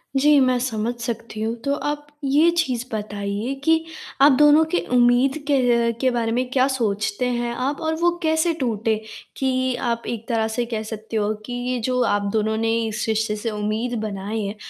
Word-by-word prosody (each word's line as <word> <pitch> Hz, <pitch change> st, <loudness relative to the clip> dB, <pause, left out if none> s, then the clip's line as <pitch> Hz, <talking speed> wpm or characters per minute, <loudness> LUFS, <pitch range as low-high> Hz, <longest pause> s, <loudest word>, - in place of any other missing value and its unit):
जी, 290 Hz, +2 st, +5 dB
मैं 255 Hz, -1 st, +3 dB
समझ 235 Hz, -2 st, -2 dB
सकती 230 Hz, -2 st, -5 dB
हूँ, 225 Hz, +2 st, -1 dB
तो 280 Hz, +3 st, 0 dB
आप 295 Hz, 0 st, -3 dB, 0.2 s
ये 295 Hz, +5 st, +4 dB
चीज़ 255 Hz, -8 st, 0 dB
बताइए 205 Hz, +3 st, -3 dB
कि 320 Hz, +1 st, +3 dB, 0.4 s
आप 285 Hz, +1 st, +8 dB
दोनों 295 Hz, +1 st, +7 dB
के 355 Hz, -, +2 dB, 0.2 s
उम्मीद 245 Hz, +4 st, +4 dB
के 245 Hz, -4 st, +3 dB
के 260 Hz, -, +3 dB
बारे 230 Hz, -2 st, -1 dB
में 250 Hz, +1 st, -1 dB
क्या 260 Hz, 0 st, +3 dB
सोचते 215 Hz, -3 st, -1 dB
हैं 240 Hz, -1 st, -1 dB
आप 270 Hz, +5 st, -2 dB
और 320 Hz, 0 st, 0 dB
वो 345 Hz, +2 st, +2 dB
कैसे 320 Hz, +1 st, +2 dB
टूटे? 225 Hz, -3 st, 0 dB, 0.4 s
कि 260 Hz, -1 st, 0 dB
आप 235 Hz, 0 st, -2 dB
एक 230 Hz, -1 st, -5 dB
तरह 225 Hz, -2 st, +1 dB
से 225 Hz, +2 st, -2 dB
कह 225 Hz, -2 st, -3 dB
सकते 220 Hz, 0 st, -5 dB
हो 210 Hz, 0 st, +1 dB
कि 245 Hz, -, -6 dB
ये 245 Hz, +1 st, -2 dB
जो 250 Hz, 0 st, +1 dB
आप 205 Hz, -2 st, 0 dB
दोनों 220 Hz, 0 st, +1 dB
ने 225 Hz, 0 st, 0 dB, 0.2 s
इस 215 Hz, 0 st, -3 dB
रिश्ते 220 Hz, -1 st, 0 dB
से 220 Hz, +2 st, -3 dB
उम्मीद 215 Hz, +3 st, -2 dB
बनाई 210 Hz, +1 st, -3 dB
है, 200 Hz, +2 st, -4 dB
240 Hz, 190 wpm, -22 LUFS, 220-265 Hz, 0.4 s, आप